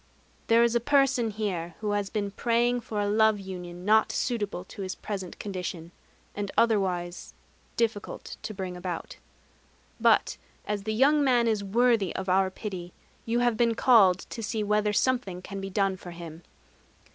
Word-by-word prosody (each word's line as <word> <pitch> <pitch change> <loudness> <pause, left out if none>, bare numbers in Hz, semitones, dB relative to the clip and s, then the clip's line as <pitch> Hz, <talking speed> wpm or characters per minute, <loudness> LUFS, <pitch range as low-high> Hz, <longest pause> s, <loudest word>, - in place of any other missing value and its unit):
"There 230 +1 +5
is 235 -1 +2
a 235 - +3
person 265 -2 +2
here 185 -6 -3
who 210 -1 -2
has 205 -1 -1
been 205 -2 -2
praying 240 +3 +1
for 215 -2 -4
a 205 - 0
love 215 0 +3
union 180 -2 -8
not 220 +1 +4
suitable 205 -7 -2
to 195 - -10
his 185 -1 -4
present 190 -4 -6
condition, 180 -4 -5 0.4
and 205 -1 -4
otherwise 185 -6 0 0.4
difficult 225 -3 -2
to - - -5
bring 190 -3 -5
about. 180 -1 -5 0.8
But - - +3 0.3
as 205 -1 -3
the 220 - -1
young 285 +5 +4
man 245 -3 +3
is 215 -3 +1
worthy 225 -1 +2
of 190 0 -3
Our 190 +1 +3
pity, 185 -3 -7 0.3
you 235 +1 +1
have 240 -2 +2
been 230 -1 +2
called 200 -8 +5
to 230 - -5
see 215 0 -2
whether 210 0 +1
something 210 -5 0
can 195 +1 -7
be 195 - -5
done 195 -1 0
for 180 - -10
him. 170 -1 -9
205 Hz, 170 wpm, -27 LUFS, 185-230 Hz, 0.8 s, There